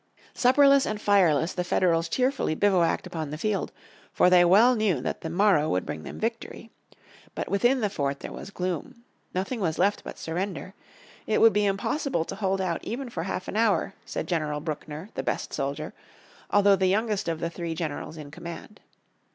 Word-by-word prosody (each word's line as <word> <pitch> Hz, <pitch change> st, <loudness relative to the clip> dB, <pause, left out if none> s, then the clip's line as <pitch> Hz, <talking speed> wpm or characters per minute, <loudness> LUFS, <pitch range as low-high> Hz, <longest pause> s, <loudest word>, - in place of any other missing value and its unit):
Supperless 275 Hz, +2 st, +5 dB
and 215 Hz, -1 st, -3 dB
fireless, 180 Hz, -6 st, +3 dB
the 180 Hz, -, -2 dB
Federals 170 Hz, -2 st, +1 dB
cheerfully 255 Hz, -, 0 dB
bivouacked 185 Hz, -3 st, +2 dB
upon 160 Hz, -4 st, -5 dB
the 150 Hz, -, -5 dB
field, 210 Hz, +4 st, -1 dB, 0.4 s
for 180 Hz, -, +4 dB
they 180 Hz, -1 st, +7 dB
well 215 Hz, +8 st, +6 dB
knew 210 Hz, -, +1 dB
that 125 Hz, -, -4 dB
the 160 Hz, -, -4 dB
morrow 175 Hz, -3 st, +3 dB
would 90 Hz, 0 st, 0 dB
bring 80 Hz, -, -5 dB
them -, -, -8 dB
victory. 230 Hz, 0 st, -4 dB, 0.6 s
But -, -, -4 dB
within 240 Hz, +6 st, +2 dB
the 210 Hz, -, +1 dB
fort 140 Hz, -6 st, -2 dB
there -, -, -6 dB
was -, -, -8 dB
gloom. 185 Hz, +4 st, -4 dB, 0.3 s
Nothing 195 Hz, +7 st, -2 dB
was 165 Hz, -5 st, -1 dB
left 205 Hz, +1 st, +1 dB
but -, -, -8 dB
surrender. 185 Hz, +2 st, -4 dB, 0.5 s
It 215 Hz, -, +2 dB
would 225 Hz, -1 st, +6 dB
be 210 Hz, 0 st, +2 dB
impossible 200 Hz, -, -1 dB
to -, -, -6 dB
hold 195 Hz, -1 st, -1 dB
out 180 Hz, -3 st, -2 dB
even 245 Hz, +1 st, -5 dB
for 165 Hz, -, -3 dB
half 185 Hz, +1 st, -4 dB
an -, -, -5 dB
hour, 215 Hz, -3 st, +2 dB
said -, -, -4 dB
General 155 Hz, -4 st, -1 dB
Buckner, 155 Hz, +3 st, -6 dB
the -, -, -3 dB
best -, -, -3 dB
soldier, -, -, -3 dB, 0.6 s
although 200 Hz, -1 st, +5 dB
the 190 Hz, 0 st, +1 dB
youngest 210 Hz, +1 st, 0 dB
of 165 Hz, -1 st, -2 dB
the 170 Hz, -, -3 dB
three 170 Hz, -1 st, -4 dB
generals 160 Hz, 0 st, -5 dB
in 145 Hz, -2 st, -9 dB
command. 170 Hz, +5 st, -9 dB
185 Hz, 185 wpm, -26 LUFS, 165-215 Hz, 0.6 s, they